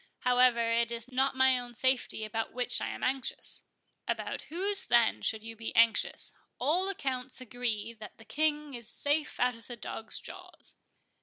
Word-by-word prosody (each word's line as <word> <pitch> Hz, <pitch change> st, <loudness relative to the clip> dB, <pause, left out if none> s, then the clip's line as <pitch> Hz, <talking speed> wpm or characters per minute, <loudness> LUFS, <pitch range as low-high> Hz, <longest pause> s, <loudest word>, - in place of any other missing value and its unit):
However, 245 Hz, -2 st, +4 dB
it 235 Hz, 0 st, +2 dB
is 235 Hz, +2 st, -4 dB
not 265 Hz, +1 st, +2 dB
my 260 Hz, -1 st, +5 dB
own 245 Hz, -1 st, -8 dB
safety 260 Hz, -3 st, 0 dB
about 220 Hz, +1 st, -3 dB
which 245 Hz, 0 st, +1 dB
I -, -, -1 dB
am -, -, -5 dB
anxious." 265 Hz, -1 st, -2 dB, 0.4 s
"About -, -, -2 dB
whose, 390 Hz, +4 st, 0 dB
then, 235 Hz, -1 st, +4 dB
should 220 Hz, -1 st, 0 dB
you 225 Hz, 0 st, -7 dB
be 225 Hz, +1 st, -6 dB
anxious?—All 280 Hz, -, +2 dB
accounts 260 Hz, -8 st, -3 dB
agree 235 Hz, -3 st, -2 dB
that 220 Hz, -2 st, -11 dB
the 225 Hz, -, -15 dB
King 300 Hz, +1 st, 0 dB
is 235 Hz, -3 st, -3 dB
safe 295 Hz, +1 st, 0 dB
out 250 Hz, 0 st, +3 dB
of 230 Hz, -1 st, -13 dB
the 240 Hz, -, -6 dB
dogs' 225 Hz, -1 st, -3 dB
jaws." -, -, -9 dB
245 Hz, 165 wpm, -31 LUFS, 230-270 Hz, 0.4 s, my